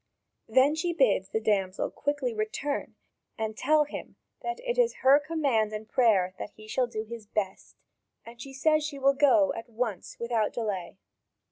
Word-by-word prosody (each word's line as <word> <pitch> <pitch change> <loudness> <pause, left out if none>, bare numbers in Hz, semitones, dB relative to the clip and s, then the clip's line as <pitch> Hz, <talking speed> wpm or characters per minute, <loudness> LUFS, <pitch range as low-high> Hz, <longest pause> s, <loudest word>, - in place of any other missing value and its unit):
Then 265 +3 +4
she 340 +2 -1
bids 210 - +2
the 220 - 0
damsel 195 -3 0
quickly 285 -4 -2
return 220 +7 -3 0.4
and 220 -1 -3
tell 300 +6 +3
him 295 - -8 0.3
that 360 +5 -4
it - - -2
is 475 -1 +2
her 275 +2 +8
command 280 -9 0
and 215 0 -6
prayer 200 -8 +3
that - - -5
he 215 0 -13
shall 250 +3 0
do 220 -2 -4
his 220 -1 -9
"best 200 -3 -4 0.3
"; - - -53
and 235 0 -11
she 275 - -8
says 310 +3 +2
she 295 -1 -4
will 275 0 +4
go 285 0 +4
at 230 -1 -8
once 225 -4 -4
without 235 -2 0
delay. 200 -7 -3
240 Hz, 175 wpm, -28 LUFS, 215-290 Hz, 0.4 s, her